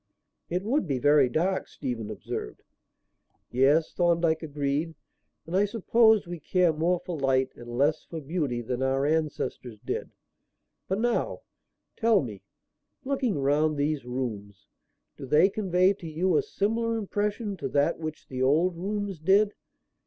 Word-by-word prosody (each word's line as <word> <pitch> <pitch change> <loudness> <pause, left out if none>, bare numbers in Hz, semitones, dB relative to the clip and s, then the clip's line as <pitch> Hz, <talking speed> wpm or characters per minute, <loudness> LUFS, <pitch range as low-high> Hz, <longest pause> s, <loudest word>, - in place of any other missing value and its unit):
"It 180 +2 -1
would 240 - 0
be 135 -3 0
very 145 0 +4
dark," 180 +8 0
Stephen 120 -6 -5
observed. 100 - -6 0.9
"Yes," 140 +6 +3
Thorndyke 170 -2 +2
agreed, 150 +1 -2 0.5
"and 170 - -4
I 200 +2 +4
suppose 220 +1 +3
we 175 -1 -6
care 180 +2 +2
more 170 +3 +1
for 175 - -4
light 135 -1 +2
and 120 0 -8
less 150 +3 +2
for 165 - -6
beauty 145 -5 -2
than 125 +2 -3
our 135 +1 +1
ancestors 150 -6 -2
did. - - -3 0.8
But 190 +2 -1
now, 240 +1 0 0.5
tell 225 -6 +3
me; 105 -6 -7 0.6
looking 260 - 0
round 145 +2 +2
these 145 -1 0
rooms, 110 -6 -5 0.5
do 135 - -8
they 150 +8 +5
convey 190 -2 +2
to 180 -4 -10
you 170 +3 0
a - - +4
similar 230 +3 -1
impression 210 0 -2
to - - -4
that 145 +4 +1
which 155 -1 -6
the 130 -1 -5
old 160 +7 +3
rooms 200 0 -3
did? 200 +6 +3
160 Hz, 145 wpm, -27 LUFS, 135-190 Hz, 0.9 s, they